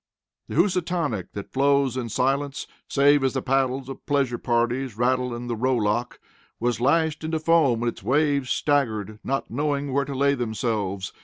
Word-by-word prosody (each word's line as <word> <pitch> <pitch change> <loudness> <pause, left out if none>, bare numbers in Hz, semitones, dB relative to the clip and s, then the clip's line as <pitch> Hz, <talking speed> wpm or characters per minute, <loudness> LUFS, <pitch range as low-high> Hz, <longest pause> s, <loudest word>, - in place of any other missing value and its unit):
The - - -6
Housatonic, 170 - 0
that 100 - -8
flows 140 -1 +2
in 125 -3 -3
silence 135 +4 -1 0.2
save 145 0 +4
as 135 - +1
the 130 - -1
paddles 135 0 0
of 135 - -8
pleasure 135 -4 +1
parties 120 0 0
rattle 125 +1 +1
in 120 +1 -6
the 120 -1 -2
row 130 +3 +1
lock, 115 +2 -1 0.4
was 120 0 -1
lashed 155 +3 +2
into 160 0 -1
foam 155 -7 +3
and 120 - +2
its - - -9
waves 140 -1 +1
staggered, 110 -8 0
not 135 -4 -2
knowing 140 +1 -1
where 140 0 +1
to 140 - -5
lay 140 +1 +3
themselves. 110 -6 -2
130 Hz, 170 wpm, -24 LUFS, 120-145 Hz, 0.4 s, save